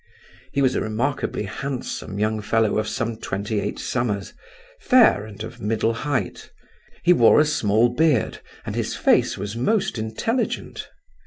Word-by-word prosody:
He 140 Hz, 0 st, +1 dB
was 130 Hz, -, +3 dB
a -, -, -1 dB
remarkably 115 Hz, +3 st, -2 dB
handsome 115 Hz, -1 st, -5 dB
young 110 Hz, +1 st, 0 dB
fellow 110 Hz, 0 st, +1 dB
of 110 Hz, -, -2 dB
some 115 Hz, +1 st, -2 dB
twenty 100 Hz, +1 st, -3 dB
eight -, -, -3 dB
summers, 110 Hz, -5 st, -2 dB, 0.5 s
fair 250 Hz, -, +4 dB
and 110 Hz, 0 st, -9 dB
of 115 Hz, +1 st, -9 dB
middle 110 Hz, +1 st, 0 dB
height; 125 Hz, -4 st, -3 dB, 0.5 s
he 180 Hz, -, +6 dB
wore 120 Hz, -6 st, +6 dB
a 150 Hz, -, +5 dB
small 115 Hz, -6 st, +2 dB
beard, 145 Hz, -1 st, +1 dB, 0.3 s
and -, -, -4 dB
his -, -, -2 dB
face -, -, +2 dB
was 100 Hz, +2 st, -5 dB
most 195 Hz, -, 0 dB
intelligent. 170 Hz, -, -3 dB
115 Hz, 150 wpm, -23 LUFS, 105-140 Hz, 0.5 s, he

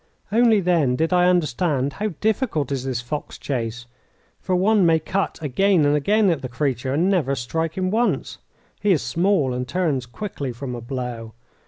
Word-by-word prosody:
Only 225 Hz, -1 st, +4 dB
then 165 Hz, -8 st, +2 dB
did 160 Hz, +6 st, 0 dB
I 180 Hz, 0 st, +4 dB
understand 150 Hz, -4 st, 0 dB
how 210 Hz, -2 st, -3 dB
difficult 210 Hz, -, 0 dB
is 135 Hz, -2 st, -2 dB
this 130 Hz, -3 st, -2 dB
fox 145 Hz, +5 st, -5 dB
chase, 120 Hz, -3 st, -4 dB, 0.5 s
for 185 Hz, -, -1 dB
one 200 Hz, +2 st, +3 dB
may 165 Hz, -2 st, +5 dB
cut 190 Hz, +5 st, -2 dB
again 175 Hz, +3 st, +2 dB
and 145 Hz, +1 st, +3 dB
again 200 Hz, +6 st, +3 dB
at 160 Hz, -, -2 dB
the 130 Hz, -, -5 dB
creature 130 Hz, -1 st, -2 dB
and 170 Hz, +5 st, +2 dB
never 160 Hz, -9 st, +1 dB
strike 160 Hz, +7 st, -3 dB
him 185 Hz, 0 st, 0 dB
once. 235 Hz, +3 st, 0 dB, 0.4 s
He 205 Hz, -2 st, +3 dB
is 155 Hz, -, 0 dB
small, 155 Hz, +1 st, +1 dB
and 125 Hz, 0 st, -3 dB
turns 145 Hz, -6 st, -1 dB
quickly 140 Hz, -, -5 dB
from 125 Hz, +1 st, -6 dB
a 120 Hz, -, -6 dB
blow. 120 Hz, -3 st, -5 dB
155 Hz, 180 wpm, -22 LUFS, 130-185 Hz, 0.5 s, may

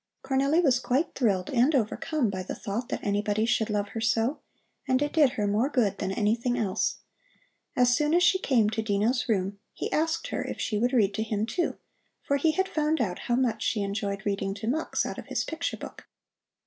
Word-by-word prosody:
Cornelli 275 Hz, +4 st, +2 dB
was 260 Hz, -5 st, +4 dB
quite 260 Hz, +6 st, 0 dB
thrilled 195 Hz, -7 st, 0 dB
and 265 Hz, +4 st, +3 dB
overcome 255 Hz, +1 st, 0 dB
by 185 Hz, -1 st, -4 dB
the 185 Hz, -, -5 dB
thought 225 Hz, +5 st, -4 dB
that -, -, -3 dB
anybody 205 Hz, +1 st, +1 dB
should 230 Hz, -1 st, +1 dB
love 205 Hz, -1 st, -1 dB
her 225 Hz, -, -5 dB
so, 230 Hz, +4 st, +1 dB, 0.5 s
and 260 Hz, -1 st, +3 dB
it 290 Hz, +1 st, -1 dB
did 295 Hz, -6 st, +4 dB
her 210 Hz, -, -1 dB
more 210 Hz, +7 st, +1 dB
good 240 Hz, -9 st, +1 dB
than 190 Hz, -, -2 dB
anything 230 Hz, +5 st, 0 dB
else. 210 Hz, -3 st, -1 dB, 0.7 s
As 245 Hz, -1 st, +4 dB
soon 300 Hz, +4 st, +2 dB
as 355 Hz, -, +4 dB
she 375 Hz, +1 st, +4 dB
came 240 Hz, -, +3 dB
to 220 Hz, -, -1 dB
Dino's 220 Hz, +4 st, 0 dB
room 200 Hz, -1 st, 0 dB, 0.2 s
he -, -, -4 dB
asked 325 Hz, +10 st, 0 dB
her -, -, -2 dB
if -, -, -6 dB
she 210 Hz, -3 st, -1 dB
would 245 Hz, +3 st, +2 dB
read 210 Hz, -6 st, +3 dB
to 220 Hz, -, -2 dB
him, 215 Hz, -1 st, -1 dB
too, 345 Hz, +9 st, -2 dB, 0.5 s
for 280 Hz, -, +1 dB
he 315 Hz, +3 st, +2 dB
had 380 Hz, +2 st, +1 dB
found 310 Hz, -3 st, 0 dB
out 190 Hz, -7 st, -1 dB
how 240 Hz, -, +3 dB
much 240 Hz, -4 st, 0 dB
she 210 Hz, -, 0 dB
enjoyed 200 Hz, 0 st, -3 dB
reading 195 Hz, -1 st, -1 dB
to 220 Hz, +2 st, -6 dB
Mux 310 Hz, +7 st, 0 dB
out -, -, -5 dB
of -, -, -10 dB
his -, -, -1 dB
picture 320 Hz, 0 st, -3 dB
book. -, -, -10 dB
235 Hz, 210 wpm, -27 LUFS, 205-275 Hz, 0.7 s, was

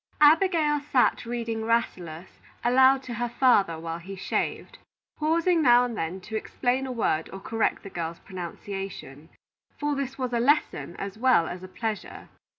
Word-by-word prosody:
Abigail 310 Hz, -1 st, +4 dB
sat 250 Hz, -2 st, +2 dB
reading 230 Hz, -2 st, -3 dB
"Rasselas" 185 Hz, -7 st, -2 dB, 0.2 s
aloud 260 Hz, +2 st, +5 dB
to 250 Hz, -, -6 dB
her 240 Hz, +1 st, -2 dB
father 205 Hz, -9 st, +3 dB
while 165 Hz, +1 st, -5 dB
he 190 Hz, +3 st, -8 dB
shaved, 190 Hz, -, -3 dB, 0.4 s
pausing 330 Hz, +2 st, +2 dB
now 245 Hz, -3 st, +6 dB
and 240 Hz, -2 st, -4 dB
then 170 Hz, 0 st, -3 dB
to 220 Hz, +4 st, -7 dB
explain 250 Hz, +4 st, -1 dB
a -, -, -4 dB
word 165 Hz, -9 st, 0 dB
or 195 Hz, -, -7 dB
correct 225 Hz, +3 st, -1 dB
the 200 Hz, -, -8 dB
girl's 170 Hz, -1 st, -4 dB
pronunciation; 180 Hz, -4 st, -7 dB, 0.5 s
for 295 Hz, 0 st, 0 dB
this 275 Hz, -1 st, -4 dB
was 255 Hz, -2 st, -3 dB
a 235 Hz, -, +2 dB
lesson, 275 Hz, -, +1 dB
as 200 Hz, +2 st, -6 dB
well 255 Hz, -9 st, +4 dB
as 180 Hz, 0 st, -6 dB
a 185 Hz, -, -8 dB
pleasure. 215 Hz, +2 st, -5 dB
230 Hz, 160 wpm, -26 LUFS, 185-260 Hz, 0.5 s, now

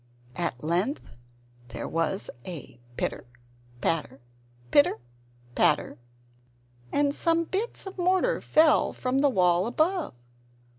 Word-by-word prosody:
At 160 Hz, -7 st, -3 dB
length 180 Hz, -, -1 dB, 0.6 s
there 120 Hz, -, -6 dB
was 165 Hz, +4 st, -1 dB
a 150 Hz, -8 st, -9 dB, 0.2 s
pitter -, -, -3 dB, 0.5 s
patter, 160 Hz, -4 st, -1 dB, 0.5 s
pitter 145 Hz, -, +5 dB, 0.6 s
patter, -, -, +2 dB, 0.9 s
and 285 Hz, 0 st, +2 dB
some 330 Hz, +2 st, +1 dB
bits 405 Hz, +8 st, -3 dB
of 385 Hz, -1 st, -8 dB
mortar 370 Hz, +7 st, +2 dB
fell 310 Hz, -1 st, +4 dB
from 255 Hz, +1 st, -1 dB
the 285 Hz, 0 st, +4 dB
wall 180 Hz, -4 st, +3 dB
above. 315 Hz, -, 0 dB
255 Hz, 105 wpm, -27 LUFS, -, 0.9 s, pitter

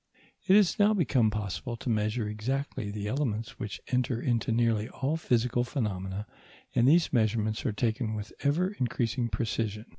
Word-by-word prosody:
It 190 Hz, -, +7 dB
has 200 Hz, -5 st, +4 dB
now 210 Hz, +1 st, +5 dB
become 130 Hz, -, +3 dB
possible 105 Hz, +3 st, -4 dB
to 115 Hz, -, -9 dB
measure 110 Hz, 0 st, 0 dB
exactly 110 Hz, +1 st, -3 dB
the 105 Hz, 0 st, -4 dB
elements 115 Hz, -1 st, -2 dB
which 105 Hz, -2 st, -5 dB
enter 125 Hz, -2 st, 0 dB
into 120 Hz, -2 st, 0 dB
nearly 115 Hz, -1 st, +1 dB
all 140 Hz, +4 st, -1 dB
physical 120 Hz, -5 st, +1 dB
phenomena, 100 Hz, -6 st, -3 dB, 0.5 s
and 120 Hz, -, +4 dB
these 165 Hz, +2 st, +4 dB
measurements 110 Hz, -1 st, +1 dB
are -, -, +1 dB
taken 110 Hz, +1 st, -1 dB
with 105 Hz, 0 st, -6 dB
ever 160 Hz, +6 st, +2 dB
increasing 120 Hz, -, -1 dB
precision. 110 Hz, -2 st, -2 dB
115 Hz, 155 wpm, -29 LUFS, 105-130 Hz, 0.5 s, It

